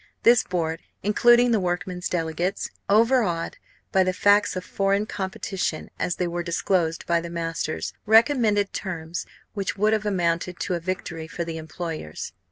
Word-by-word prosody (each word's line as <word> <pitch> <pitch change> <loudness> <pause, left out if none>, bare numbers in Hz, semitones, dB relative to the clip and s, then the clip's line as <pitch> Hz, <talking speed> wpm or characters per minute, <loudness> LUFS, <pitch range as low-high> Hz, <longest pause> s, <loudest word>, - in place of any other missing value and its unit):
This 235 0 +7
board, 165 -3 -2 0.2
including 240 +4 +5
the 225 - +3
workmen's 180 0 -2
delegates, 175 +2 -2 0.2
overawed 215 -6 +3 0.3
by 190 - +4
the 185 0 0
facts 205 +2 +4
of 185 - -4
foreign 200 +1 +1
competition 190 -4 -3
as 175 - 0
they 180 - -1
were 175 0 -2
disclosed 170 -1 0
by 170 -1 +2
the 170 - -6
masters, 165 -2 -3
recommended 220 -3 +4
terms 170 -3 -4 0.3
which 200 -1 -3
would 210 +2 +3
have 215 -1 0
amounted 175 -2 0
to 185 - -1
a 175 - 0
victory 165 -2 -4
for 170 +1 -4
the 165 -1 -5
employers. 160 - -6
180 Hz, 155 wpm, -25 LUFS, 170-205 Hz, 0.3 s, This